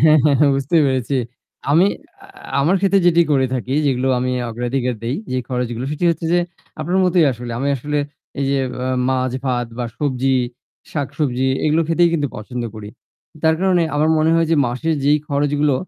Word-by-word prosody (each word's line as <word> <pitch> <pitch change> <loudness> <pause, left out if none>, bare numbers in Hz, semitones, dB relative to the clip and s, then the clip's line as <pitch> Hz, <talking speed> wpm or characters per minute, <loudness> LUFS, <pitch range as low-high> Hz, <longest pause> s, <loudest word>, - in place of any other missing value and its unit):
হ্যাঁ, 155 0 +6
হ্যাঁ, 145 -2 +4
হ্যাঁ 145 - +5
বুঝতেই 150 +4 +2
পেরেছি। 130 0 0 0.5
আমি 170 +6 +5 0.4
আ - - -12 0.3
আমার 165 +7 +3
ক্ষেত্রে 195 0 +3
যেটি 170 0 +5
করে 130 -2 +3
থাকি 130 +2 -2
যেগুলো 130 -1 +1
আমি 125 +1 -1 0.2
অগ্রাধিকার 125 +2 -2
দেই 120 +4 -2 0.2
যে 130 - 0
খরচগুলো, 125 -1 -2
সেটি 160 +4 -3
হচ্ছে 165 0 -3
যে 175 - +4 0.4
আপনার 175 +5 0
মতোই 180 -2 +4
আসলে। 120 0 -7
আমি 140 +2 -1
আসলে 150 +4 -2 0.4
এই - - +1
যে 140 - +1 0.3
অ - - -2 0.2
মাছ 130 -1 0
ভাত 120 -2 0
বা 120 - -1
সবজি 135 -2 0 0.6
শাকসবজি 130 -3 -1 0.2
এগুলো 155 +2 +3
খেতেই 170 +1 +4
কিন্তু 145 -3 0
পছন্দ 120 +3 -5
করি। 105 -1 -8 0.5
তার 160 0 +4
কারণে 185 -3 +3
আমার 155 +2 +2
মনে 155 +1 +3
হয় 165 -1 +3
যে 165 - +3
মাসের 155 +7 -1
যেই 150 +1 +4
খরচগুলো 145 0 +1
140 Hz, 180 wpm, -19 LUFS, 125-160 Hz, 0.6 s, হ্যাঁ